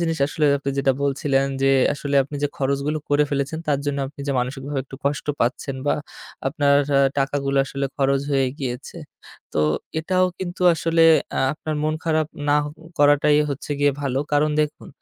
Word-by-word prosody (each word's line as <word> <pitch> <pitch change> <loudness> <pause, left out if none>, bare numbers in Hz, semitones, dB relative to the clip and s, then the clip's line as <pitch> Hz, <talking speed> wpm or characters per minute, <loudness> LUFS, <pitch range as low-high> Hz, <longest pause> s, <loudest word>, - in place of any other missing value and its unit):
জিনিস 165 -1 -1
আসলে 150 +1 0
আপনি 140 0 -3
যেটা 135 -1 +3
বলছিলেন 135 -1 +1 0.2
যে 135 - +4 0.2
আসলে 140 0 -4
আপনি 140 +2 -7
যে 145 - +2
খরচগুলো 140 +3 -1
করে 145 +1 +3
ফেলেছেন 140 +2 -1
তার 145 -2 +2
জন্য 145 -1 -1
আপনি 145 +1 -13
যে - - +1
মানসিকভাবে 135 +3 -3
একটু 135 - -10
কষ্ট 140 -2 -1
পাচ্ছেন 130 +3 -1
বা - - +3 0.5
আপনার 145 0 +2 0.2
আ - - +5 0.2
টাকাগুলো 140 0 0
আসলে 140 +1 -4
খরচ 135 -1 +2
হয়ে 135 -1 +3
গিয়েছে। 125 -1 -5 0.6
তো - - +2 0.4
এটাও 185 +3 +1
কিন্তু 180 -1 -5
আসলে 165 0 +1 0.3
আ - - +1
আপনার 155 0 -5
মন 155 0 +1
খারাপ 155 -1 +1 0.2
নাহ 145 0 +3 0.3
করাটাই 145 +1 +5
হচ্ছে 140 +1 -6
গিয়ে 145 0 +4
ভালো। 135 -2 -1
কারণ 150 +1 +3
দেখুন 150 0 -3
145 Hz, 170 wpm, -22 LUFS, 135-150 Hz, 0.6 s, আ